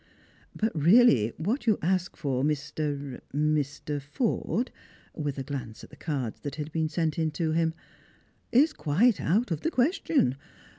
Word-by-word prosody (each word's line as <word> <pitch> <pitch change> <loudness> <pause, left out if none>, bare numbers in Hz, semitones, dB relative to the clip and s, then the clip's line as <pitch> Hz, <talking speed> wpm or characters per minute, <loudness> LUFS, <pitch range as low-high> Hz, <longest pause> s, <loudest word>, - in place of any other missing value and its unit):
"But 220 +1 0
really 155 - +5
what 220 - -2
you 215 - +4
ask 180 +1 0
for, 135 -4 -1
Mr.— 145 -2 -2
Mr. 150 -1 0
Forde," 225 - -1 0.4
with 145 -3 -3
a 135 - -3
glance 125 -5 -6
at - - -12
the - - -12
cards 135 -8 -3
that 145 -1 -5
had 155 0 -5
been 160 0 0
sent 160 -2 -1
in 160 -1 +1
to 160 0 -1
him, 165 0 +1 0.4
" - - -37
is 315 - -9
quite 195 - +2
out 205 +6 +1
of 160 -1 -1
the - - 0
question. 270 - +1
155 Hz, 160 wpm, -28 LUFS, 145-185 Hz, 0.4 s, really